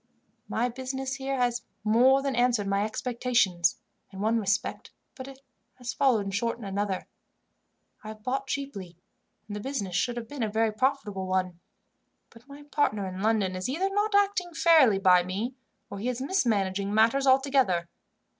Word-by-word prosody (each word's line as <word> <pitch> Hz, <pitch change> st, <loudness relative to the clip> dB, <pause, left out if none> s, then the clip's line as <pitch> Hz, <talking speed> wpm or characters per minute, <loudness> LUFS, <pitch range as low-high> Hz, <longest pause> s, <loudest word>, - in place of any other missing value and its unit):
"My 235 Hz, +2 st, 0 dB
business 265 Hz, +2 st, -4 dB
here 270 Hz, 0 st, -3 dB
has 245 Hz, -2 st, 0 dB, 0.2 s
more 250 Hz, +5 st, +4 dB
than 275 Hz, -2 st, -1 dB
answered 240 Hz, -4 st, +2 dB
my 195 Hz, +1 st, +1 dB
expectations, 220 Hz, -6 st, +1 dB, 0.3 s
in 190 Hz, -, -10 dB
one 220 Hz, +3 st, +1 dB
respect, 200 Hz, -1 st, -2 dB, 0.2 s
but 265 Hz, 0 st, -9 dB, 0.4 s
has 250 Hz, 0 st, -6 dB
fallen 225 Hz, -9 st, +2 dB
short 230 Hz, +5 st, -1 dB
in 235 Hz, -, -11 dB
another. 195 Hz, -1 st, -2 dB, 1.0 s
I -, -, -9 dB
have 215 Hz, 0 st, -9 dB
bought 270 Hz, +3 st, -2 dB
cheaply, 200 Hz, -, -5 dB, 0.5 s
and 205 Hz, -, -6 dB
the -, -, -4 dB
business 205 Hz, -7 st, -4 dB
should 240 Hz, +6 st, 0 dB
have 230 Hz, -1 st, -5 dB
been 290 Hz, 0 st, -7 dB
a 220 Hz, -, 0 dB
very 220 Hz, +1 st, +1 dB
profitable 215 Hz, -6 st, -1 dB
one; 185 Hz, -2 st, -1 dB, 0.7 s
but 235 Hz, +3 st, -18 dB
my 285 Hz, +1 st, -12 dB
partner 290 Hz, -9 st, 0 dB
in 185 Hz, 0 st, -6 dB
London 210 Hz, -4 st, +1 dB
is 185 Hz, +5 st, -3 dB
either 370 Hz, +8 st, -1 dB
not 415 Hz, +1 st, +1 dB
acting 395 Hz, -4 st, +1 dB
fairly 310 Hz, -, +5 dB
by 185 Hz, -2 st, +5 dB
me, 195 Hz, +8 st, -3 dB, 0.4 s
or 200 Hz, -, -6 dB
he 235 Hz, +5 st, -2 dB
is 250 Hz, -1 st, -3 dB
mismanaging 205 Hz, -, 0 dB
matters 230 Hz, +6 st, +3 dB
altogether. 260 Hz, -10 st, +3 dB
230 Hz, 165 wpm, -27 LUFS, 200-270 Hz, 1.0 s, fairly